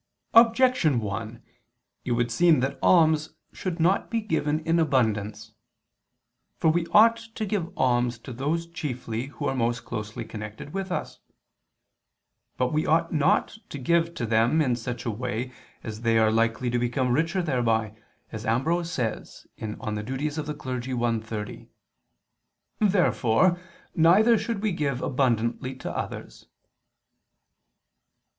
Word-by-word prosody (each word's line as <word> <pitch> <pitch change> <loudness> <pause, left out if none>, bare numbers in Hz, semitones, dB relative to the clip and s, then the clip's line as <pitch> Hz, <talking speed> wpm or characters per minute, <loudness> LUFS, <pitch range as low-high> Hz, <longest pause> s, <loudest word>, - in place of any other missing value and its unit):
Objection 230 - +5
1: 110 +3 -5 0.6
It 125 - 0
would 120 0 0
seem 165 +3 +4
that 135 +2 -2
alms 155 -3 +3 0.2
should 180 -2 -4
not 180 +4 +2
be 230 - 0
given 160 -7 -1
in 165 +1 +1
abundance. 110 -7 0 1.1
For 160 - +3
we 170 +1 0
ought 225 +4 +6
to 225 -1 -6
give 190 -5 -2
alms 120 -2 +1
to 130 - -8
those 150 +7 -1
chiefly 125 -7 -5
who 140 - -7
are 135 - 0
most 120 -2 -1
closely 110 0 -5
connected 105 +6 -8
with 195 -1 -4
us. - - -4 1.4
But 125 +2 0
we 155 +1 0
ought 165 +2 +2
not 160 +7 +1
to - - -6
give 170 +5 +1
to 120 - -2
them 115 +7 +2
in 130 -6 +2
such 120 0 -5
a 115 - 0
way 125 +2 -4 0.3
that 110 0 -7
they 115 -1 +2
are 110 -1 +4
likely 115 +2 +1
to 120 - +1
become 125 +1 0
richer 165 +6 +1
thereby, 115 -7 0 0.4
as 110 -1 -6
Ambrose 165 +10 0
says 115 -8 -4
(De 110 -1 -4
Officiis 130 +9 -3
i, 125 -5 -2
30). 110 -1 -7 1.1
Therefore 180 - +3 0.3
neither 195 +8 +5
should 225 -4 -3
we 215 - +1
give 145 -7 -1
abundantly 125 -1 0
to 130 - -6
others. - - -6
130 Hz, 135 wpm, -26 LUFS, 115-165 Hz, 1.4 s, ought